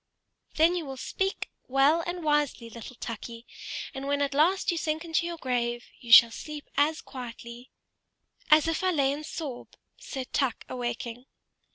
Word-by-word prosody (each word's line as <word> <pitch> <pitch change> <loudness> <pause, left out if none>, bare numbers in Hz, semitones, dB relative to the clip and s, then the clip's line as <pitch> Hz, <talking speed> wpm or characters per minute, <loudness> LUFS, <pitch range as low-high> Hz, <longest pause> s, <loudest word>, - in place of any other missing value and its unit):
"Then 330 +3 +4
you 345 -3 -2
will 270 -1 -6
speak 385 +8 -2 0.2
well 275 +5 +4
and 350 0 -4
wisely, 295 -6 0
little 235 +2 -9
Tukey; 230 0 -7 0.5
and 270 0 -5
when 285 0 +1
at 280 -1 -1
last 350 +7 +3
you 340 - -2
sink 315 +1 -2
into 335 +1 0
your 340 -1 -5
grave, 240 -3 -1
you 235 - -8
shall 230 0 +10
sleep 300 +4 -7
as 300 +3 +2
quietly 240 -1 -9 0.4
" - - -53
"As 305 +1 +6
if 330 +2 -1
I 370 - +3
lay 280 -6 +2
in 290 +2 -4
Soroe," 295 -5 -6 0.3
said 265 -3 -7
Tuk, 265 -5 0
awaking. 240 0 -4
275 Hz, 170 wpm, -28 LUFS, 245-315 Hz, 0.5 s, shall